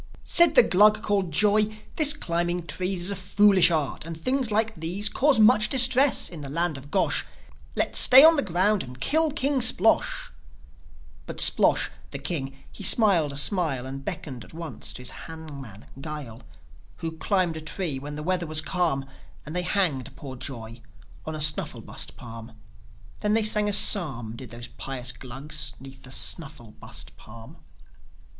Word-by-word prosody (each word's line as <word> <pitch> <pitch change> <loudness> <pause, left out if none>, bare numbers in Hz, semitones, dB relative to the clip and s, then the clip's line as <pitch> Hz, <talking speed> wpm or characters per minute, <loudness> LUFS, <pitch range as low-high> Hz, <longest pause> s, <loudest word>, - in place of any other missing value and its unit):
Said 345 0 +5
the - - +7
Glug 210 +3 +3
called 195 -4 -1
Joi, 210 +6 +2 0.2
"This 300 -2 +6
climbing 175 - -3
trees 185 +1 -2
Is 190 - -2
a - - -4
foolish 195 -1 +3
art, 155 -5 -3
and 165 0 -9
things 255 +6 -1
like 220 +1 0
these 180 +5 -1
Cause 275 -3 +1
much 215 0 +4
distress 260 +1 +4
in 165 -4 -10
the 140 - -8
land 165 +2 -1
of 135 +1 -11
Gosh. - - 0 0.5
Let's - - -1
stay 265 +2 +9
on 325 +1 +7
the 285 - +3
ground 190 +1 0
and 125 0 -11
kill 315 - +3
King 280 -2 0
Splosh!" 225 -3 +1 1.0
But - - -8
Splosh, - - +1 0.2
the - - -7
king, 135 -1 -5
he - - -12
smiled 190 -10 +4
a 140 - -7
smile, 145 -6 0
And 135 +1 -8
beckoned 130 -4 -7
once 165 0 -7
to 125 - -9
his 125 - -4
hangman, 140 -10 -11 0.2
Guile, 145 -7 -8 0.5
Who 165 - -6
climbed 185 -4 0
a - - -7
tree 155 -3 -3
when 145 +2 -8
the 150 - -7
weather 180 0 -2
was 155 0 0
calm; 160 -4 -2 0.4
And 155 +3 -9
they 180 - -1
hanged 145 - 0
poor 135 -2 -10
Joi 120 -3 -9 0.5
on 160 - -5
a 155 - -7
Snufflebust 150 0 -1
Palm; 115 -1 -12 0.7
Then 210 +1 -1
they 225 - +2
sang 210 -1 +2
a - - 0
psalm, 135 - +3
Did 125 +1 -11
those 120 0 -9
pious 130 -1 -7
Glugs 135 +1 -4
'neath 135 0 -14
the 130 - -13
Snufflebust 130 -5 -4
Palm. 115 +1 -15
165 Hz, 165 wpm, -24 LUFS, 135-210 Hz, 1.0 s, stay